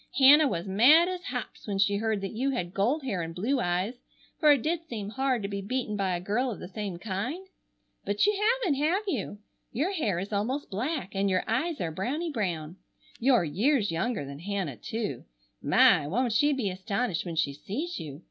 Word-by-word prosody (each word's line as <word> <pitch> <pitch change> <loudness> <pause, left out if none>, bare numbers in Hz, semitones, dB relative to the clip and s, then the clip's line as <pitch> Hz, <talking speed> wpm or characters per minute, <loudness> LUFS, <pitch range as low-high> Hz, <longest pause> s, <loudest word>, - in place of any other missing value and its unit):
Hannah 285 +3 +8
was 175 -7 -2
mad 260 - +6
as 365 0 -4
hops - - -6
when 200 -2 -2
she 200 +1 +3
heard 220 -1 -1
that 195 - -4
you 255 +5 0
had 185 -10 -3
gold 245 +11 +1
hair 200 -9 -2
and 165 0 -5
blue 255 +9 0
eyes, 185 +5 -1 0.4
for 305 -2 +6
it 280 -5 +3
did 330 +1 -1
seem 210 -4 -4
hard 260 -1 0
to - - -1
be 200 0 -4
beaten 220 +1 -2
by 190 -3 0
a - - -2
girl 215 +8 0
of 225 - -4
the - - -7
same 200 -2 -5
kind? 225 - -4 0.6
but 205 - +1
you 420 - +3 0.3
haven't, 295 -9 +1
have 340 +8 +1
you? 255 - -3 0.3
Your 295 - 0
hair 225 - -1
is 195 +4 -4
almost 245 +8 -2
black 225 - -3
and 195 0 +1
your 185 -1 +1
eyes 290 +8 -1
are 165 - -2
brownie 275 - -2
brown. 175 - -3 0.4
You're 245 -4 +4
years 205 - +1
younger 170 - -1
than 140 +1 -8
Hannah, 185 - -3
too. 215 - -4 0.4
My! 145 - +5
Won't 235 - 0
she 290 +6 +3
be 250 -9 -1
astonished 195 -1 -2
when 170 -2 -5
she 150 -3 +1
sees 255 - -4
you! 145 -2 -7
215 Hz, 205 wpm, -28 LUFS, 190-270 Hz, 0.6 s, Hannah